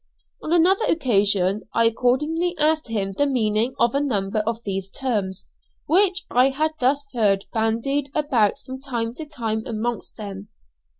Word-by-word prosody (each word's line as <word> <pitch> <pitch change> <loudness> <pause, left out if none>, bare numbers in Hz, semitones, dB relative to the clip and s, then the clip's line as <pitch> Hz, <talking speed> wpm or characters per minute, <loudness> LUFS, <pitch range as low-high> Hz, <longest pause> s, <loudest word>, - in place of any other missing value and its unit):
On 310 - -5
another 360 +5 +4
occasion 205 - +2
I 230 - +4
accordingly 300 +10 +1
asked 305 0 +1
him 205 -4 -2
the 285 +9 0
meaning 230 -2 +1
of 235 0 +2
a 280 - +2
number 215 -7 -1
of 230 0 -2
these 195 -1 -4
terms 200 -6 -3 0.4
which 385 +2 +2
I 255 +2 +4
had 305 +4 0
thus 275 +3 +1
heard 200 -5 +2
bandied 230 +6 0
about 260 -9 +2
from 260 0 -8
time 235 -4 -3
to 310 +4 -8
time 225 -7 -3
amongst 230 +1 -4
them. 200 -1 -7
240 Hz, 155 wpm, -23 LUFS, 215-290 Hz, 0.4 s, another